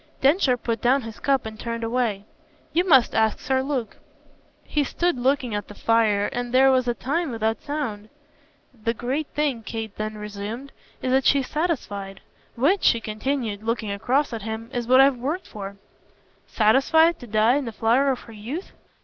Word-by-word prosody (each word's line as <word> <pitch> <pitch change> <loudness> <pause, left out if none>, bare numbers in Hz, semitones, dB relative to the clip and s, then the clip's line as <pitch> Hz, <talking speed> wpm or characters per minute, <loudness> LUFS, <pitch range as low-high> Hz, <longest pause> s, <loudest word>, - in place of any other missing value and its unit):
Densher 275 -2 +3
put 230 -2 -3
down 260 +2 +3
his 225 -1 -9
cup 275 -3 +1
and 220 0 -7
turned 230 0 -4
away. 225 -4 -1 0.5
"You 345 - +3
must 265 -9 +5
ask 220 -1 +2
Sir 265 -1 0
Luke." 265 -4 -3 0.7
He 295 - 0
stood 345 +5 0
looking 255 -2 +1
at 205 0 -3
the 205 - -11
fire 220 -3 +2
and 245 0 -3
there 265 +1 +6
was 255 -1 +2
a 240 - +1
time 320 +6 -1
without 225 -2 -1
sound. 240 -9 -4 0.6
"The 230 -1 -3
great 270 +6 -2
thing," 285 -6 0
Kate 220 -1 -6
then 215 0 -4
resumed, 210 +6 -6 0.3
"is 255 - 0
that 265 0 +3
she's 275 -2 +3
satisfied. 205 - -3 0.3
Which," 300 +11 +2
she 230 - +4
continued, 220 -1 -3
looking 225 -1 -2
across 255 +7 0
at 225 - -4
him, 220 +2 -6
"is 240 -1 -2
what 255 +1 +7
I've 270 -1 +4
worked 295 +10 -3
for." 200 -1 -8 0.7
"Satisfied 320 +9 +4
to 245 - -10
die 220 +4 +3
in 285 - -2
the 230 - -4
flower 235 +6 +2
of 260 -2 -1
her 230 - -13
youth?" 245 - -6
240 Hz, 180 wpm, -24 LUFS, 220-275 Hz, 0.7 s, what